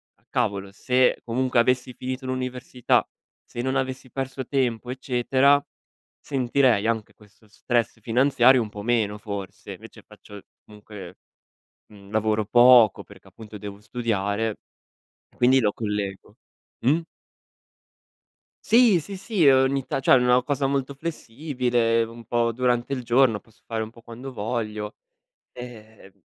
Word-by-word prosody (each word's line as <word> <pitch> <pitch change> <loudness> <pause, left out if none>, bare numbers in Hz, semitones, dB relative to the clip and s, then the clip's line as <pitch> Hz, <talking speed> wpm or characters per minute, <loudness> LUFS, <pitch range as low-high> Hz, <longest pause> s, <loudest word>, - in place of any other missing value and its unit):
"Ah, - - -38
cavolo 100 -1 -2
se 125 +5 +1
comunque 125 +2 -1
avessi 125 +1 +1
finito 130 +1 -6
l'università, 125 -1 -1 0.4
se 120 - -6
non 130 +1 -2
avessi 130 -1 -3
perso 135 0 -5
tempo 125 -3 -1
eccetera, 130 +2 +2 0.6
sentirei 125 -4 +1
anche 115 -2 -2
questo 105 +1 -23
stress 115 +1 -2
finanziario 125 +2 +4
un 110 - -7
po' 105 0 -8
meno, 105 -2 0
forse". 100 -4 -7
Invece - - -13
faccio 105 -1 -14 0.2
comunque 105 -4 -12 0.8
mhmm, 100 -1 -15
lavoro 110 0 0
poco 120 -1 +6
perché - - -17
appunto 105 -2 -12
devo 100 0 -9
studiare. 105 -1 -2 0.8
Quindi 130 +2 +4
lo 105 -2 +2
collego. 105 -3 -4 0.5
Mh? 150 +6 +4 1.7
Sì, 225 -5 +5
sì, 195 +6 -8
sì, 195 -2 0
ogni 135 0 +3
ta - - -1
cioè, 135 - +3
una 125 0 +4
cosa 140 0 -1
molto 140 0 -2
flessibile, 125 -6 -1
un 115 +1 -11
po' 115 +1 0
durante 125 +2 0
il 130 -2 -2
giorno, 120 -2 +3
posso 115 -1 -27
fare 115 -1 -3
un 110 - -6
po' 115 0 -18
quando 125 +4 -9
voglio, 105 -2 -4 0.6
ehm, 110 -5 -12
120 Hz, 135 wpm, -24 LUFS, 110-130 Hz, 1.7 s, poco